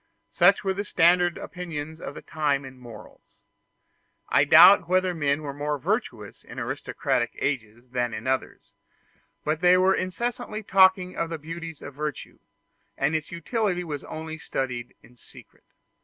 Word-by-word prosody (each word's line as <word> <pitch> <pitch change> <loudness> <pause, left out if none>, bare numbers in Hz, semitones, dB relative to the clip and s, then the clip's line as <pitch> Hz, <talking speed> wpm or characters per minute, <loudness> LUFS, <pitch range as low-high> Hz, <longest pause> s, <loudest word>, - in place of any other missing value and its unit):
Such - - +4
were 190 -1 0
the 200 +2 -3
standard 175 -1 +3
opinions 160 -3 -7
of - - -7
that - - -10
time 145 -3 -1
in 130 -1 -12
morals. 115 -4 -14 0.9
I - - +4
doubt 185 -3 +8
whether 185 0 +2
men 145 -2 0
were 140 -2 -5
more 145 +1 -2
virtuous 135 - -3
in - - -12
aristocratic - - -2
ages 120 -3 -3
than 120 -1 -1
in 110 +1 -6
others; 130 0 -3 0.7
but 155 +1 0
they 180 0 +6
were 185 +1 +4
incessantly 215 +3 -3
talking 190 -2 +4
of 165 - -2
the 165 - -4
beauties 165 +1 -8
of 145 - -8
virtue, 150 0 -6 0.6
and 145 +3 +1
its 155 - -3
utility 180 +1 -1
was 150 -5 -5
only 160 0 -7
studied 125 -5 -4
in 125 - -20
secret. - - -17
160 Hz, 155 wpm, -25 LUFS, 140-180 Hz, 0.9 s, doubt